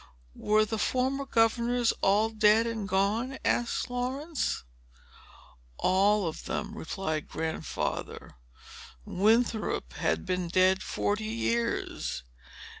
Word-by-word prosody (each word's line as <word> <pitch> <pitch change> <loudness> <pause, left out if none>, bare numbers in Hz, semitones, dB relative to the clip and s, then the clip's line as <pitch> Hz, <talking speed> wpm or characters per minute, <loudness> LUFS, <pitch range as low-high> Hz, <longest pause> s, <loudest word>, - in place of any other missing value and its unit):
"Were 215 +1 +2
the 220 0 -3
former 265 +4 0
governors 235 +1 +2
all 210 +3 +3
dead 220 +1 +4
and 225 -3 -3
gone?" 215 +8 0
asked 240 0 0
Laurence. 260 - -2 1.1
"All 200 +2 +3
of 160 - -6
them," - - -3
replied 160 -3 -3
Grandfather. 160 0 -4 0.7
"Winthrop 215 - +1
had 80 +5 -1
been 180 -1 -1
dead 185 +2 +3
forty 210 +1 -1
years. 230 - -2
215 Hz, 100 wpm, -29 LUFS, 190-235 Hz, 1.1 s, dead